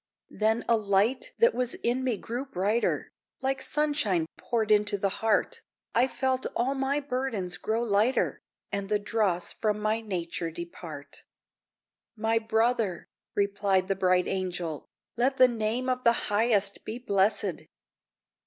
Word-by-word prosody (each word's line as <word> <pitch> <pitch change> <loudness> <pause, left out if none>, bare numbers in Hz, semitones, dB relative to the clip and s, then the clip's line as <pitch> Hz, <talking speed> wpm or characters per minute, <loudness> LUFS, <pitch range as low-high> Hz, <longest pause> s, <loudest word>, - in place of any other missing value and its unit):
Then 220 +2 +1
a 230 - +5
light 215 - +1
that 470 +1 +5
was 250 -1 -1
in 245 +2 -1
me 250 -4 0
grew 240 +6 -4
brighter, 210 +1 0 0.3
Like 265 0 -1
sunshine 285 - +1
poured 225 -3 -1
into 210 0 +4
the 195 0 -1
heart; 220 -1 +1 0.3
I 245 +3 +4
felt 260 -1 -1
all 250 +4 +1
my 270 +1 0
burdens 250 - -2
grow 225 +5 -1
lighter, 220 +3 +1 0.3
And 200 0 -3
the 210 - +3
dross 205 -4 0
from 210 -1 -1
my 215 +1 0
nature 175 -5 -3
depart. 160 -3 -8 0.9
"My 225 +1 +1
brother," 225 -4 0 0.3
replied 200 -2 +1
the 195 - +2
bright 185 -1 +3
Angel, 175 -5 -3 0.3
"Let 265 +3 +2
the 255 - +8
name 235 +2 -1
of 255 0 0
the 235 0 +2
Highest 205 -2 +2
be 220 - -5
blessed! 200 -5 0
220 Hz, 140 wpm, -28 LUFS, 195-245 Hz, 0.9 s, the